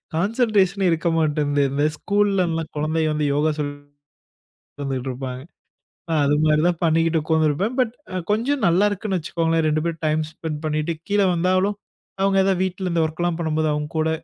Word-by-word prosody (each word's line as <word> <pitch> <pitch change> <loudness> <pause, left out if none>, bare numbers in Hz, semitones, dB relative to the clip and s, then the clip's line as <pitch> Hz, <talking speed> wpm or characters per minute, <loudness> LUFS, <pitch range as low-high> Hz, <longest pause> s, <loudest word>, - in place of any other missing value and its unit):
Concentration 200 0 +2
ஏ - - +4
இருக்க 165 +1 0
மாட்டேன்து. 145 -2 +1
இந்த 145 +2 +1
ஸ்கூல்‌லல்லாம் 185 -5 0
குழந்தைய 155 +1 0
வந்து 150 -1 0
யோகா 150 +2 +2
சொல்லி 145 -1 -2 1.0
உக்காந்துட்ருப்பாங்க, 130 -2 -4 0.7
அ - - +1
அது 145 +1 +3
மாரி 155 0 +3
தான் 175 -2 0
பண்ணிக்கிட்டு 165 0 +2
உக்காந்துருப்பேன். 160 - +1
பட் 230 -1 -1 0.4
கொஞ்சம் 255 +6 0
நல்லாருக்குன்னு 195 +2 +1
வச்சுக்கோங்களேன்! 165 0 0
2 155 0 +1
பேரும் 165 -1 -4
டைம் 155 +1 +1
ஸ்பென்ட் 155 -2 -5
பண்ணிட்டு 155 +2 -1 0.2
கீழ 205 0 +3
வந்தாலும், 185 +4 +1 0.5
அவுங்க 195 0 +2
ஏதாவது 190 -1 +1
வீட்ல 185 0 -3
இந்த 165 - +2
ஒர்க்லாம் 170 +2 -2
பண்ணும்போது, 155 -1 0
அவுங்க 150 0 -3
கூட 160 - +1
165 Hz, 150 wpm, -22 LUFS, 155-190 Hz, 1.0 s, ஏ